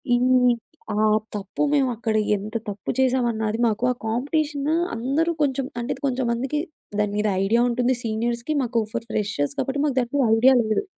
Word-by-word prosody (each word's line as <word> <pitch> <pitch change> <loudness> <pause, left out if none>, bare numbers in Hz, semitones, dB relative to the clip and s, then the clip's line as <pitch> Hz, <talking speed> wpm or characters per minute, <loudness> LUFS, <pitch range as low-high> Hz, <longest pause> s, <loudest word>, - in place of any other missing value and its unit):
ఇన్ని 250 0 +4 0.4
ఆహ్, 215 0 +3 0.2
తప్పు 200 +7 -3
మేమక్కడ 245 -6 +1 0.2
ఎంత 210 +2 -6 0.2
తప్పు 200 0 -7
చేసామన్నది 235 -4 +1
మాకు 220 +1 -1
ఆ - - 0
కాంపిటీషనూ 290 +5 0 0.2
అందరూ 275 +8 0
కొంచెం 275 -2 +1 0.2
అంటే 235 - -3
ఇది 265 - -17
కొంచెం 260 -1 -1
మందికి 265 +5 -1 0.4
దాని 210 -1 +1
మీద 210 +1 +1 0.2
ఐడియా 225 +4 +3
ఉంటుంది. 245 +1 +1
సీనియర్స్‌కి 235 +5 -1
మాకు 235 -1 0
ఫర్ 230 -1 -3
ఫ్రెషర్స్ 145 -10 -1
కాబట్టి 275 +1 -1
మాకు 280 -3 0
దాని 240 -2 -1
మీద 275 -3 +3
ఐడియా 255 +4 +6
లేదు. 215 - 0
240 Hz, 165 wpm, -23 LUFS, 220-265 Hz, 0.4 s, ఐడియా